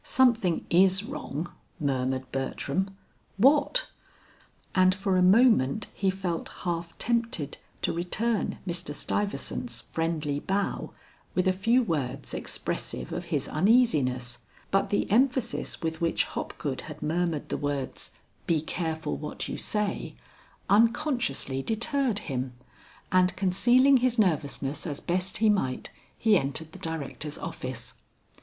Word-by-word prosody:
"Something 235 -10 +3
is 190 +2 +5
wrong," 175 - -5 0.3
murmured 130 -2 -1
Bertram. 145 +8 -2 0.4
"What?" 290 - +4 0.9
And 185 0 +5
for 195 -1 0
a 185 - +4
moment 200 - +5
he 195 - +1
felt 185 -3 -2
half 170 -1 -3
tempted 230 - -1 0.2
to - - +1
return 205 +6 0
Mr. 175 -4 -2
Stuyvesant's 205 +6 -2
friendly 160 -3 -2
bow 195 +5 -1 0.5
with 185 0 +2
a 185 - +4
few 230 +7 +3
words 150 - -2
expressive 60 -1 -3
of - - -4
his - - -1
uneasiness, 150 - +2 0.3
but 195 - +2
the 205 - +1
emphasis 245 -3 +1
with 160 0 -2
which 165 -1 +2
Hopgood 135 -3 -4
had 150 0 -8
murmured 165 -1 -1
the - - -1
words, 145 -2 -3 0.4
"Be 165 -2 +3
careful 160 -1 -3
what 150 - -5
you - - -4
say," 210 -2 -2 0.5
unconsciously 225 - +2
deterred 235 - 0
him, 130 -3 -3 0.6
and 185 0 +4
concealing 240 +9 +5
his 250 -1 +1
nervousness 150 -6 0
as 145 -2 -3
best 185 +2 -1
he 220 +1 +4
might, 130 -11 -1 0.3
he 215 -4 +4
entered 155 +4 -3
the - - -11
Directors' 155 -2 -3
office. - - -6
180 Hz, 125 wpm, -28 LUFS, 150-220 Hz, 0.9 s, is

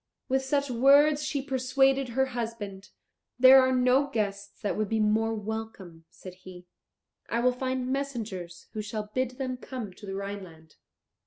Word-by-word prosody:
With 265 0 +1
such 280 0 0
words 285 +5 +5
she 295 -2 -2
persuaded 270 0 +1
her 265 +3 +1
husband. 220 -5 -5 0.5
"There 260 +1 +9
are 260 0 +2
no 255 +2 +3
guests 200 -6 -3
that 205 - -1
would 215 -2 -1
be 225 - 0
more 220 +1 +2
welcome," 210 -6 -7
said 185 +1 -11
he; 180 -1 -13 0.6
"I 235 - 0
will 250 +1 +3
find 255 0 -3
messengers 220 -11 -5
who 215 - -3
shall 210 0 -5
bid 255 -1 -2
them 255 -2 -3
come 245 -6 -7
to 205 - -13
the 195 - -4
Rhineland." 190 -6 -8
230 Hz, 160 wpm, -28 LUFS, 200-265 Hz, 0.6 s, There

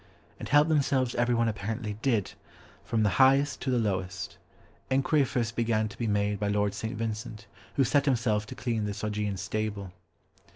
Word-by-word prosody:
And - - -6
help 145 +3 +5
themselves 135 -5 +2
everyone 120 -1 +2
apparently 110 +1 -3
did, 115 -8 +1 0.5
from 110 +1 0
the 105 - +4
highest 135 +2 +4
to - - -2
the 125 - +2
lowest. 95 -3 -2 0.5
Enquiry 135 +3 +3
first 115 -3 -2
began 110 -2 +1
to 100 - -12
be 115 - -1
made 105 -1 0
by 105 - -1
Lord 105 0 +1
St. 110 +2 -4
Vincent, 110 0 -4 0.3
who 135 - +4
set 140 +3 +2
himself 115 -6 +1
to - - -8
clean 115 -4 -1
this 105 0 -5
Augean 105 -2 -2
stable. 105 -2 -3
110 Hz, 170 wpm, -28 LUFS, 105-125 Hz, 0.5 s, help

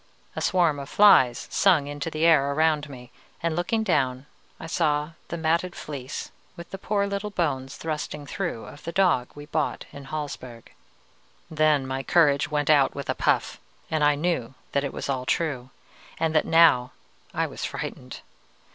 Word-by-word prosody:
A - - -3
swarm 170 -6 +2
of 140 0 -7
flies 130 - +5
sung 175 -8 +4
into 145 +2 -4
the 155 +1 -1
air 140 -4 +4
around 155 -1 +1
me, 125 -3 -11 0.3
and 165 -1 0
looking 200 +6 0
down 130 -9 0 0.3
I - - -8
saw 150 -2 0 0.2
the 170 - -5
matted 170 +2 0
fleece, 140 -2 -6 0.2
with 170 -1 -11
the 195 - -6
poor 200 0 0
little 200 +1 -3
bones 145 -8 -2
thrusting 150 -2 -5
through, 170 - -4
of 145 - -12
the 170 - -4
dog 175 -10 +2
we 145 - -9
had 150 - -17
bought 155 -2 -1
in 140 -1 -10
Hallsberg. 135 -6 -7 0.8
"Then 155 -3 +2
my 130 0 -3
courage 145 0 +3
went 150 0 +1
out 140 -3 +4
with 140 -1 -3
a - - -1
puff, - - 0 0.3
and 155 -1 +1
I 145 0 +4
knew 145 -6 -2 0.2
that 140 - 0
it 140 - -2 0.2
all 135 -2 -1
was 125 - -8
true, 140 -7 -1 0.5
and 160 -1 0
that 155 - +3
now 160 -7 +5 0.4
I - - 0
was - - -7
frightened. - - -6
150 Hz, 175 wpm, -25 LUFS, 140-170 Hz, 0.8 s, flies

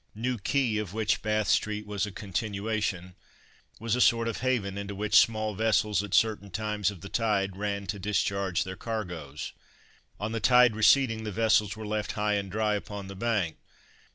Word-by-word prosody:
New 120 +2 -2
Quay, 120 0 +1
of 105 -2 -5
which 110 -1 +1
Bath 110 -1 0
street 105 0 +1
was 105 0 -2
a - - -7
continuation, 100 -2 -3 0.7
was 115 0 0
a 125 - 0
sort 115 -1 +4
of 115 - -2
haven, 115 -7 0
into 100 0 -5
which 105 +1 -1
small 110 -1 +4
vessels, 105 -1 +2
at 105 -1 -2
certain 110 -3 +2
times 105 0 -1
of 100 -5 -9
the 95 - -7
tide, 100 -4 0
ran 100 0 -3
to 100 +2 -4
discharge 100 -2 0
their 95 0 -6
cargoes. 90 -10 -5 0.7
On 105 +2 -3
the 115 - -2
tide 125 0 +5
receding 110 0 +4
the 105 - -4
vessels 110 0 +2
were 110 - -6
left 105 0 -2
high 105 0 0
and 100 -2 -2
dry 105 +1 +1
upon 100 -1 -5
the 100 - -7
bank. 105 -6 -1
105 Hz, 180 wpm, -28 LUFS, 100-110 Hz, 0.7 s, tide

